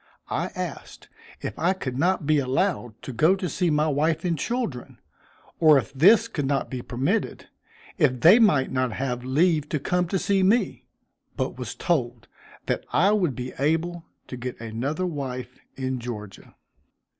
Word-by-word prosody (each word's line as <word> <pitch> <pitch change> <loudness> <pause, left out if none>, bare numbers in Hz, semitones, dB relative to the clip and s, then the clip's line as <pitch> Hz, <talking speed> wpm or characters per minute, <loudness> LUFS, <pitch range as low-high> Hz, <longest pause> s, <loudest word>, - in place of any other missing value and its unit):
I - - -1
asked - - -7 0.3
if - - -5
I 180 +3 +2
could 130 -9 -5
not 175 +3 +1
be 155 0 +3
allowed 130 - -1
to 130 - -6
go 160 +11 +4
to 185 -1 -3
see 175 +2 0
my 150 0 +2
wife 155 +4 0
and 170 -2 +1
children, 160 - -4 0.6
or 155 -3 +7
if 135 +1 -2
this 205 +11 +5
could 145 -12 -3
not 135 0 -1
be 130 -2 -4
permitted, 135 - -2 0.5
if 130 -6 +2
they 185 +9 +8
might 150 - +3
not 130 -3 0
have 125 -1 -3
leave 150 +3 +2
to 150 - -1
come 180 +4 0
to 190 - -1
see 195 +1 +1
me; 205 +6 +1 0.5
but - - -2
was - - -5
told 125 -9 -1 0.4
that - - -1
I 195 +5 +4
would 180 - +1
be 125 0 -6
able 165 +4 0 0.3
to 125 - -6
get 125 0 -6
another 120 +10 -3
wife 130 -6 -5 0.2
in 130 -1 -3
Georgia. 105 -5 -8
150 Hz, 165 wpm, -25 LUFS, 130-180 Hz, 0.6 s, they